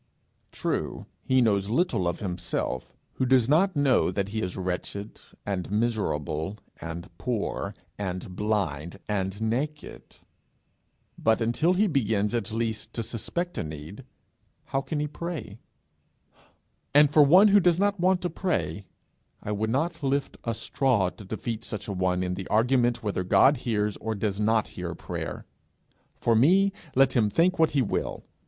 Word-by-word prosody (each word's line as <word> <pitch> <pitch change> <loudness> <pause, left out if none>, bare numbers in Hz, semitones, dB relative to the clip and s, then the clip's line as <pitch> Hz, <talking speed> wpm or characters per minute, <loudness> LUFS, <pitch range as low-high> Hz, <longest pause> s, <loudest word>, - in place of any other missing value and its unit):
True, - - -3 0.2
he 130 0 +3
knows 100 -3 +1
little 115 - +1
of 85 - -2
himself 90 -8 -3 0.3
who 130 - +1
does 125 -3 +4
not 175 +6 +3
know 140 -3 +3
that 100 -1 -2
he 110 +1 -2
is 90 -1 -3
wretched, 95 +3 -4 0.2
and 95 -3 -3
miserable, 100 - -1 0.2
and 85 +1 -7
poor, 120 -5 -2 0.2
and 95 -2 -4
blind, 95 -6 -1
and 95 -1 -2
naked; 135 +7 -3 1.0
but 110 0 +3
until 120 +10 +2
he 205 +4 +3
begins 110 - +1
at 115 -2 -1
least 110 -1 -3
to 115 - -2
suspect 150 +10 -3
a - - -1
need, 80 - -8 0.6
how 135 0 -1
can 140 +3 -3
he 150 - 0
pray? 155 - -6 1.4
And 145 0 +7
for 150 - +6
one 180 +9 +7
who 205 +1 +7
does 175 -2 +3
not 205 -1 +1
want 185 +1 +3
to 175 - -1
pray, 160 - -2 0.6
I 105 - -3
would 105 +1 -1
not 165 +7 -1
lift 140 0 -1
a 115 -1 -2
straw 110 -7 +1
to 105 - -12
defeat 110 +3 -4
such 105 -3 -5
a 100 - -3
one 90 -1 0
in 90 0 -1
the 95 0 -5
argument 120 +2 +2
whether 100 -3 -1
God 135 +10 +5
hears 105 -4 -1
or 110 0 -3
does 100 -1 -2
not 110 0 +2
hear 85 -2 -5
prayer: - - -5 0.7
for 115 - +1
me, 190 - +4 0.2
let 135 +1 +5
him 110 -4 +3
think 175 - +2
what 160 -1 +5
he 135 - +4
will! 105 - -3
110 Hz, 160 wpm, -27 LUFS, 100-140 Hz, 1.4 s, And